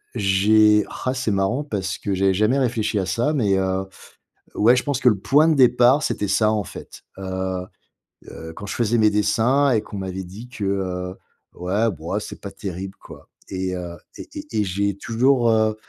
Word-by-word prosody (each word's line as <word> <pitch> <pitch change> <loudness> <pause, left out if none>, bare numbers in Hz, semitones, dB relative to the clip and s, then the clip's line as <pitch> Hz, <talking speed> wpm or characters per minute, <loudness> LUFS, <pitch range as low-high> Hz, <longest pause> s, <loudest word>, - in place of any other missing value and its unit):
j'ai 105 +1 +4 0.2
ah 130 - 0
c'est 130 -4 -1
marrant 100 +8 0
parce 95 - -3
que 100 - -2
j'avais 95 0 +2
jamais 110 +7 +2
réfléchi 115 -4 0
à 95 - -1
ça 120 +10 0
mais, 105 -9 +2
heu, 95 0 -1 0.7
ouais 115 +4 +5
je 125 - +1
pense 145 -3 -1
que 125 - +5
le 105 - +3
point 145 +10 +4
de 160 - +4
départ 125 +2 +5
c'était 105 - -1
ça 105 +2 +3
en 105 -2 -1
fait. - - -11 0.2
Heu, 95 -1 -3 0.7
heu, 80 0 -9
quand 100 - -8
je - - -4
faisais 120 0 +1
mes 110 -1 +5
dessins 115 +7 +2
et 110 -3 +2
qu'on 105 - -9
m'avait 95 0 -4
dit 105 +8 -11
que, 110 -5 -5
heu, 90 -2 -2 0.4
ouais 100 +6 0
bo 80 -2 -7
oh - - +1
c'est - - -8
pas 100 - -7
terrible 95 -1 -6
quoi - - -14 0.2
et 95 -1 -3
heu, 85 -1 -6 0.2
et - - -9
et 300 0 -7
et - - +3
j'ai 100 +1 -1
toujours, 120 +3 +2
heu 110 -1 +2
105 Hz, 200 wpm, -22 LUFS, 95-120 Hz, 0.7 s, ouais